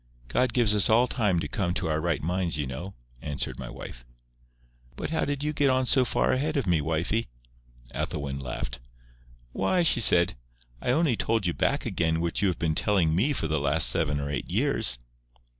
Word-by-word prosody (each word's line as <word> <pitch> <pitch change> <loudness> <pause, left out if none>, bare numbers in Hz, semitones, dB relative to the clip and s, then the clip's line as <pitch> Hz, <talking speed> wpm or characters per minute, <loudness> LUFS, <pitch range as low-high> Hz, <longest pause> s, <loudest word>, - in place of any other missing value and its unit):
God 125 - +1
gives 115 -4 +3
us 105 -2 +3
all 120 +3 +4
time 105 -10 0
to - - -3
come 90 -3 -2
to - - -2
our 80 0 -1
right 85 -3 -1
minds, 90 -1 -1
you 75 - -2
know," 70 +10 -7 0.3
answered 75 -2 -4
my - - -6
wife. - - -10 0.9
"But - - -5
how 160 - 0
did 145 0 -3
you 150 0 -1
get 145 -2 +2
on 130 0 +2
so 130 0 +3
far - - +1
a 130 - 0
head 155 +2 -1
of 135 - 0
me, 85 -4 +2
wifie?" 80 +9 -1 0.7
Ethelwyn 70 -2 -4
laughed. 65 -1 -5 0.7
"Why," 180 - +1
she 165 - +3
said, 85 -5 +6 0.5
"I - - -3
only 150 -1 +2
told 110 -2 -1
you 85 - 0
back - - 0
again 80 -1 0
what 85 +2 -1
you 100 - +3
have 90 - -1
been 80 -1 0
telling 85 -2 +2
me 105 - +2
for 135 - -2
the 80 -1 0
last 70 -2 +3
seven 75 +1 0
or 70 0 -4
eight 70 - -4
years." - - +2
85 Hz, 205 wpm, -26 LUFS, 75-120 Hz, 0.9 s, said